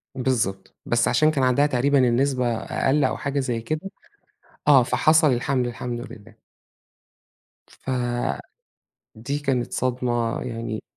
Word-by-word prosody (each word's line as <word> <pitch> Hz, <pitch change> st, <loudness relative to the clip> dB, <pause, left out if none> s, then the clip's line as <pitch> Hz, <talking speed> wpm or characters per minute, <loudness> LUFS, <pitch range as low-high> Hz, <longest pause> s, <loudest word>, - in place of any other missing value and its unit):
بالضبط، 115 Hz, -8 st, -2 dB
بس 120 Hz, 0 st, +1 dB
عشان 155 Hz, 0 st, +3 dB
كان 140 Hz, -3 st, 0 dB
عندها 130 Hz, +3 st, +3 dB
تقريبًا 140 Hz, +1 st, +2 dB
النسبة 125 Hz, -1 st, +2 dB
أقل 135 Hz, +7 st, 0 dB
أو 130 Hz, -, 0 dB
حاجة 140 Hz, 0 st, -2 dB
زي 120 Hz, -4 st, -2 dB
كده، 155 Hz, +10 st, -4 dB, 0.8 s
آه 135 Hz, -3 st, +7 dB
فحَصَل 155 Hz, +4 st, +3 dB
الحَمْل 125 Hz, +1 st, 0 dB
الحمد 120 Hz, 0 st, -5 dB
لله. 110 Hz, +1 st, -15 dB, 1.4 s
فدي 120 Hz, -, -3 dB, 0.8 s
كانت 135 Hz, -4 st, -1 dB
صدمة، 120 Hz, -2 st, -1 dB
يعني 115 Hz, -3 st, -5 dB
125 Hz, 115 wpm, -23 LUFS, 120-140 Hz, 1.4 s, آه